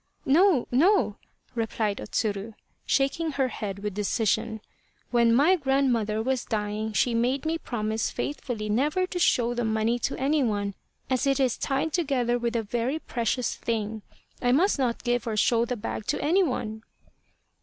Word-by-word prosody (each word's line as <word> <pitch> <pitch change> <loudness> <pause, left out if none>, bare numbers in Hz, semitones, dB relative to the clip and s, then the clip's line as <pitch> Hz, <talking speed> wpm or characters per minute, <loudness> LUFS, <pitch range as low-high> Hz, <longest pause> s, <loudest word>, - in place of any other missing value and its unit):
" - - -39
No, 330 -1 +4
no! 300 - +3 0.2
" - - -39
replied 225 -3 -1
O - - -5
Tsuru, 210 0 -2 0.3
shaking 295 +3 +1
her 270 -2 +1
head 200 -5 -5
with 210 -1 -2
decision. 220 +2 0 0.3
" - - -39
When 235 -1 +4
my 290 +10 +5
grandmother 255 - +1
was 260 0 0
dying 215 0 -2
she 240 +3 +2
made 250 +5 0
me 325 +1 0
promise 220 -5 -2
faithfully 245 -7 -4
never 295 - +1
to 365 -1 -4
show 240 -8 +3
the 240 0 -1
money 220 +2 +1
to - - -2
any 285 +3 +1
one, 205 -5 -1 0.3
as 260 +1 0
it 275 0 +2
is 255 -3 +2
tied 275 +3 -1
together 255 -7 +1
with 235 0 -2
a 230 - +1
very 240 +7 -1
precious 240 -4 -2
thing. 220 -1 -3 0.4
I 245 - +2
must 320 +5 +3
not 245 -3 -1
give 240 -1 0
or 220 -2 -2
show 230 +2 +3
the 250 +1 -3
bag 215 0 -5
to - - 0
any 335 +7 +3
one." 220 - -2
240 Hz, 175 wpm, -26 LUFS, 220-275 Hz, 0.4 s, my